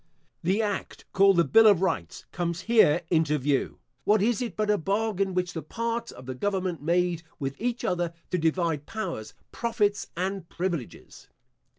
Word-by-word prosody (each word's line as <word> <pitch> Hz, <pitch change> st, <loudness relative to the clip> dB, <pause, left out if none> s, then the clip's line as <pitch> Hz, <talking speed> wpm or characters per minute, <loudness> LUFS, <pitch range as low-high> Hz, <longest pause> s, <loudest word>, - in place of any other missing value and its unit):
The 195 Hz, +6 st, +1 dB
act, 205 Hz, -2 st, -4 dB
called 195 Hz, -1 st, +5 dB
the 170 Hz, -, +6 dB
Bill 220 Hz, +10 st, +6 dB
of 200 Hz, -5 st, +6 dB
Rights, 85 Hz, -, -2 dB
comes 175 Hz, -1 st, -2 dB
here 185 Hz, -7 st, +4 dB
into 160 Hz, -3 st, +3 dB
view. 140 Hz, 0 st, 0 dB, 0.3 s
What 210 Hz, +1 st, +4 dB
is 225 Hz, +3 st, +1 dB
it, 235 Hz, -7 st, -3 dB
but 215 Hz, -1 st, +1 dB
a 210 Hz, -, +3 dB
bargain, 195 Hz, +1 st, 0 dB
which 180 Hz, -1 st, -1 dB
the 160 Hz, -, -4 dB
parts 230 Hz, +7 st, -3 dB
of 125 Hz, -, -12 dB
the 130 Hz, -, -4 dB
government 185 Hz, +2 st, -2 dB
made 170 Hz, +1 st, +1 dB, 0.2 s
with 135 Hz, -2 st, -3 dB
each 240 Hz, 0 st, -1 dB
other 175 Hz, -4 st, 0 dB, 0.2 s
to 180 Hz, -, +1 dB
divide 160 Hz, -2 st, 0 dB
powers, 175 Hz, -, -5 dB, 0.2 s
profits, 210 Hz, -3 st, 0 dB
and 190 Hz, -1 st, -3 dB
privileges? 170 Hz, -8 st, -5 dB
180 Hz, 170 wpm, -27 LUFS, 165-210 Hz, 0.3 s, the